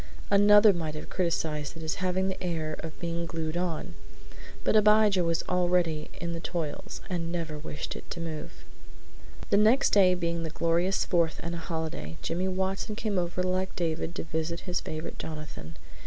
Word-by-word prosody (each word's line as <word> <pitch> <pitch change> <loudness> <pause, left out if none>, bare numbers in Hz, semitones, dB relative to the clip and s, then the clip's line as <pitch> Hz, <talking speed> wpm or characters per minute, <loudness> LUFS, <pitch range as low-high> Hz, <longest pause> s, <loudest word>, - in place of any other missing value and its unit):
Another 205 +1 +7
might 160 -3 -3
have 155 - -7
criticised 160 -4 -1
it 165 - -7
as 160 - -1
having 185 +1 +1
the 190 0 -4
air 160 -3 -2
of 160 -1 -7
being 170 0 -2
glued 160 -1 -3
on, 175 - -2 0.7
but - - +2
Abijah 210 -3 +5
was 165 0 +1
already 175 -4 +1
in 170 0 -3
the 165 - -3
toils 170 +3 -4
and 170 -3 -2
never 165 -3 -3
wished 150 0 -5
it - - -9
to - - -5
move. 160 -2 -6 0.9
The - - +6
next 220 +6 +5
day 185 -3 +6
being 170 -1 -1
the 165 - -3
glorious 170 +4 +1
Fourth 170 -3 +1
and 170 +1 -3
a 170 - -3
holiday, 160 - -4
Jimmy 180 +3 -1
Watson 190 +3 -1
came 210 -3 0
over 175 +1 -1
like 185 +1 -1
David, 165 0 -2
to - - -3
visit 160 +1 -2
his 180 -1 -2
favorite 155 +1 -5
Jonathan. 150 - -7
170 Hz, 175 wpm, -29 LUFS, 160-185 Hz, 0.9 s, Another